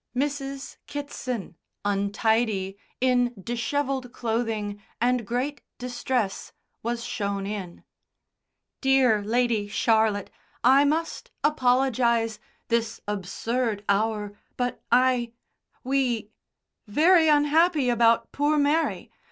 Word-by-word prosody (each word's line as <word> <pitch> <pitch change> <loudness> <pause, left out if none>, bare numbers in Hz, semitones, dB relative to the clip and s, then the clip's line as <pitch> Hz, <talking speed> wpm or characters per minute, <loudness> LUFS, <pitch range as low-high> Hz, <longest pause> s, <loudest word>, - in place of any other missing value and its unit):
Mrs. 275 0 -3
Kitson, 255 - -5 0.3
untidy, 205 0 0 0.2
in 245 -1 +2
dishevelled 250 +4 -2
clothing, 220 -4 -2 0.2
and 245 -2 +1
great 260 +5 -2 0.2
distress, 245 -3 -2 0.3
was 235 +1 -3
shown 200 -4 -3
in. 195 -4 -6 1.0
"Dear 260 -6 +4
Lady 230 -1 +1
Charlotte, 220 -1 +1 0.3
I 270 +3 +6
must 320 +3 -1
apologise 245 -5 +2 0.3
this 230 -1 0
absurd 210 +2 -2
hour 210 0 0 0.2
but 245 -1 -2
I 245 -1 +3 0.5
we 250 -5 0 0.6
very 320 - +5
unhappy 300 0 +4
about 230 -1 +3
poor 295 +2 +1
Mary. 295 +3 +1
240 Hz, 90 wpm, -26 LUFS, 215-270 Hz, 1.0 s, I